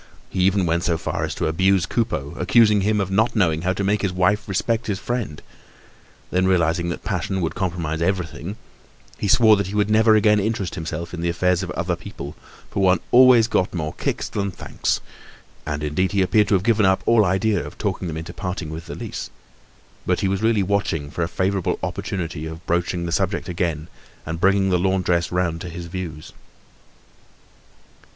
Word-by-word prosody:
He - - -3
even 95 +1 +3
went 85 0 +1
so 85 -1 +1
far - - -3
as - - -5
to - - -2
abuse 95 +2 +2
Coupeau, 85 - -2
accusing 105 +2 +4
him 105 +2 +1
of 95 -1 -1
not 110 +5 +2
knowing 80 -7 +2
how 90 +2 0
to 100 - -3
make 100 +1 +1
his 95 - 0
wife 95 +4 +1
respect 115 +4 0
his 100 -3 -1
friend. 115 -10 -3 0.9
Then, 95 +1 +2
realising 85 -2 +2
that 85 - -5
passion 95 - -2
would 85 -3 -1
compromise 85 -4 -2
everything, 90 -1 -2 0.6
he - - -1
swore 110 +1 +6
that 100 -2 -1
he 100 - -5
would 105 0 +1
never 110 0 +5
again 105 0 +4
interest 105 -3 -2
himself 85 +2 -5
in 85 - -5
the 85 - 0
affairs 90 +1 +1
of 95 - -5
other 85 0 -1
people, 85 -5 -9 0.4
for 100 - -1
one 90 -2 +4
always 125 -2 +7
got 95 -5 0
more 80 -2 -3
kicks - - -2
than 100 -1 -2
thanks; 90 - -2 0.7
and 75 -1 -3
indeed 90 +6 0
he 100 -1 +3
appeared 100 +3 +3
to 100 - +3
have 95 - +1
given 110 -1 +3
up 95 0 +2
all 115 -2 +5
idea 100 +1 +1
of - - -10
talking 90 - -2
them 80 -1 -4
into 85 +2 -7
parting 90 -4 -4
with 80 +1 -7
the - - -6
lease, - - -6 0.8
but - - +1
he - - +1
was 95 0 -1
really 110 -2 +2
watching 90 -7 -1
for 85 - -4
a 80 - +1
favorable 95 0 0
opportunity 80 -4 -4
of 80 +2 -9
broaching 85 0 -1
the 85 - -3
subject 95 +3 -1
again 85 -3 -2 0.4
and 80 +1 -4
of - - -12
bringing 95 0 +3
the 90 - +3
laundress 90 -2 +1
round 85 -2 -1
to 90 - -6
his 85 +1 -7
views. 85 -3 -7
95 Hz, 200 wpm, -22 LUFS, 85-100 Hz, 0.9 s, always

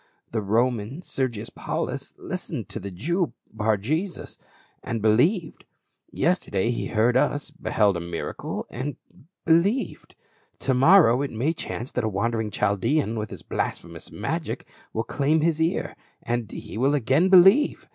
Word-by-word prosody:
The 110 - -1
Roman, 115 - 0
Ser 130 -6 -1
gius 115 -1 -8
Paulus, - - -4
listened - - -5
to - - -5
the 100 - -6
Jew, 165 - -1 0.2
Bar 110 0 +1
Jesus, 155 - -3 0.4
and 115 - -3
be 110 +1 +3
lieved; 155 - +2 0.5
yesterday 120 - +1
he 120 - -2
heard 115 +2 +2
us, 145 +3 +1
beheld 105 - +1
a - - -2
miracle 85 0 -5
and 135 +4 -4 0.3
— 165 +8 -30
believed. 175 +10 +1 0.5
To 135 - +1
morrow 135 -2 +6
it 140 - -1
may 130 +9 0
chance 125 -5 -5
that 125 - -1
a 110 - +1
wandering 110 +2 -1
Chaldean 105 +6 +1
with 105 -2 -3
his - - -9
blasphemous 85 -1 -4
magic - - -4 0.2
will 110 - -1
claim 145 +6 +1
his 160 0 +1
ear; 165 +2 0 0.5
he 110 - -7
will 140 +4 +3
again 145 +7 +3
believe. 195 +10 +6
125 Hz, 150 wpm, -25 LUFS, 110-160 Hz, 0.5 s, morrow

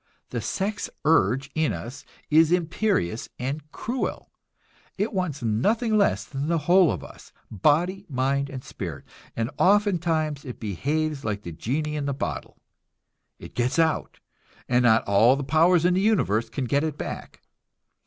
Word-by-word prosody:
The - - -2
sex 205 +2 -2 0.2
urge 140 -2 +3
in 160 -1 +1
us 125 +3 -7 0.3
is 160 +1 +5
imperious 170 - 0
and 135 +5 -3
cruel; 245 +3 -4 0.7
it 210 +3 -1
wants 165 -9 -2
nothing 215 - +1
less 205 -1 +2
than 140 +1 -4
the 170 0 +2
whole 180 0 +5
of 90 -10 -4
us, - - -13 0.2
body, 170 - +1
mind 140 +1 0
and 130 -2 -7
spirit, - - -7 0.3
and 115 +3 -2
ofttimes 170 -7 +2
it 125 -3 -8
behaves 145 - -2
like 105 -1 -3
the 85 - -6
genii 150 - -2
in 145 -1 -2
the 140 - -1
bottle - - -5 0.8
it - - -11
gets 125 +4 0
out, 160 -1 +1 0.5
and 125 0 +3
not 115 -2 +4
all 110 +6 +5
the 140 - -3
powers 165 +5 +4
in 180 - +4
the 185 - +2
universe 175 - +2
can 135 - -3
get 140 +4 +1
it 155 -2 -2
back. - - -7
150 Hz, 155 wpm, -25 LUFS, 125-175 Hz, 0.8 s, is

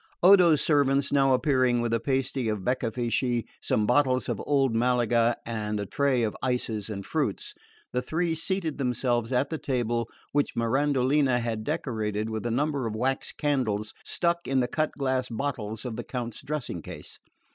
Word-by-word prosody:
Odo's 175 -5 +7
servants 140 -2 +2
now 135 -1 +4
appearing 130 -3 +2
with 120 -1 -1
a 115 - +2
pasty 130 -1 -1
of 105 -3 -2
beccafichi, 120 0 0 0.2
some 105 - +1
bottles 130 +1 +2
of - - -2
old 135 -4 +2
Malaga 120 0 +2
and 105 -2 -2
a 100 - -2
tray 135 +2 +1
of 110 - -1
ices 115 -5 -1
and 100 -2 -5
fruits, - - -2 0.4
the 125 - +1
three 165 +6 -1
seated 165 -2 -2
themselves 125 -2 0
at 130 +4 +1
the 160 - -2
table, 120 -3 -1 0.2
which 145 0 0
Mirandolina 130 +2 +2
had 115 -2 -3
decorated 110 -7 -2
with 110 +2 -3
a - - -1
number 140 0 0
of 110 - -4
wax 130 +4 -1
candles 115 -8 -1
stuck 170 0 0
in 135 0 +2
the 125 - +1
cut 155 +4 0
glass 130 -2 -1
bottles 115 -3 -4
of 115 -3 -4
the - - -4
Count's 120 -3 -5
dressing 140 - -4
case. - - -8
125 Hz, 170 wpm, -27 LUFS, 115-140 Hz, 0.4 s, Odo's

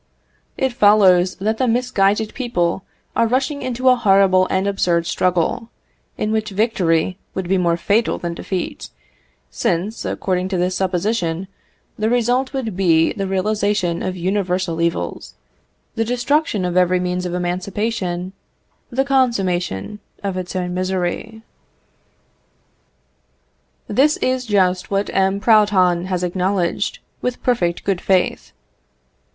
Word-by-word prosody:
It 265 -2 0
follows 195 -5 +5
that 220 +3 -2
the 255 - +2
misguided 220 -3 +1
people 190 -8 -1 0.3
are 230 - +3
rushing 270 +4 0
into 255 +1 -2
a 255 - +7
horrible 195 -4 +4
and 190 +1 0
absurd 175 -4 +1
struggle, 185 +4 0 0.5
in 215 - -1
which 220 -1 -1
victory 190 -4 0 0.2
would 190 -2 -3
be 190 +1 +2
more 170 -1 +1
fatal 210 +6 +1
than 170 -1 -4
defeat; 180 +1 -5 0.6
since, 185 +6 -1
according 185 -1 -1
to 190 - -1
this 180 +1 0
supposition, 185 -1 -1 0.5
the 215 +1 +1
result 245 +2 +1
would 250 -8 -3
be 165 -4 +3
the 195 -3 -3
realisation 195 -2 0
of 185 -1 -3
universal 180 -2 -1
evils, 170 0 -2 0.6
the 225 - 0
destruction 245 -3 0
of 180 -1 -2
every 180 0 +3
means 180 0 -2
of 175 - -4
emancipation, 185 0 -2 0.6
the 270 +2 0
consummation 210 - 0 0.2
of 195 -2 -2
its 185 0 -5
own 180 -1 -2
misery. 185 +4 -3 2.4
This 280 +8 +3
is 255 -1 -1
just 185 -3 +1
what 200 0 -1
M. 195 +1 +2
Proudhon 200 -5 +3
has 185 -1 -2
acknowledged, 180 0 -1 0.2
with 250 0 -3
perfect 175 -9 0
good 195 -3 -1
faith. 185 -2 0
190 Hz, 125 wpm, -20 LUFS, 180-220 Hz, 2.4 s, a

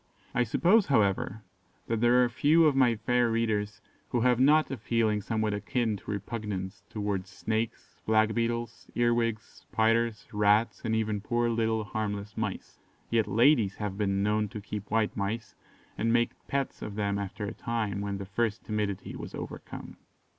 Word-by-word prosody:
I 125 - +2
suppose, 185 - +4
however, 105 -3 +1 0.4
that 115 -1 -1
there 120 +1 +5
are - - +3
few 155 +7 +4
of 150 -3 +4
my 125 -3 +4
fair 120 +2 +1
readers 110 -2 -1 0.3
who 120 - 0
have 125 0 +3
not 150 +4 +5
a 135 - -3
feeling 110 -1 +1
somewhat 110 0 -1
akin 110 +2 -1
to - - -13
repugnance 105 -2 -4
towards 100 -3 -3
snakes, 110 +4 -4
black 110 0 +3
beetles, 115 0 -2
earwigs, 120 -2 +1
spiders, 115 0 0
rats, 105 +2 +3
and 110 -2 0
even 110 -2 0
poor 120 +2 0
little, 110 -1 +1
harmless 105 0 -4
mice; 105 -3 -4 0.3
yet 115 -2 +2
ladies 115 -2 +4
have 105 -3 -4
been 100 -1 0
known 105 0 +1
to 110 - -6
keep 105 0 -6
white 110 -1 +1
mice, 105 +3 -3 0.5
and 115 +1 +2
make 120 0 +3 0.2
pets 140 -1 -2
of 100 - -6
them 100 -1 0
after 100 +2 -4
a 105 - -4
time, 110 -5 -2
when 100 -1 -3
the 100 - -6
first 105 +3 -1
timidity 105 -3 -3
was - - -7
overcome. - - -8
110 Hz, 165 wpm, -29 LUFS, 105-120 Hz, 0.5 s, there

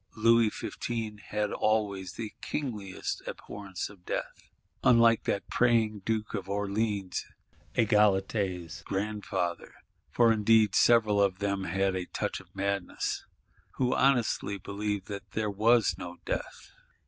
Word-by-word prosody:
Louis 115 0 +5
XV. 110 -1 -4
had 105 -1 -1
always 100 -4 0
the 110 -2 -6
kingliest 105 -10 -4
abhorrence 100 -4 -6
of 100 -4 -16
Death. - - -5 0.3
Unlike 115 -2 +5
that 100 - -1
praying 115 -3 +2
Duke 110 +1 -2
of 95 0 -4
Orleans, 100 -1 -1 0.5
Egalité's 100 -5 +2
grandfather,—for 105 +3 -1
indeed 110 -1 +4
several 110 -3 +5
of 95 -2 +2
them 100 -1 -1
had 95 0 0
a 90 -1 -3
touch - - -3
of - - -16
madness,—who 100 +5 -3
honesty 120 -6 +2
believed 100 +1 -3
that 100 -2 -7
there 110 -1 -1
was 110 +1 +4
no 90 -1 -7
Death! - - -4
105 Hz, 115 wpm, -29 LUFS, 95-110 Hz, 0.5 s, Louis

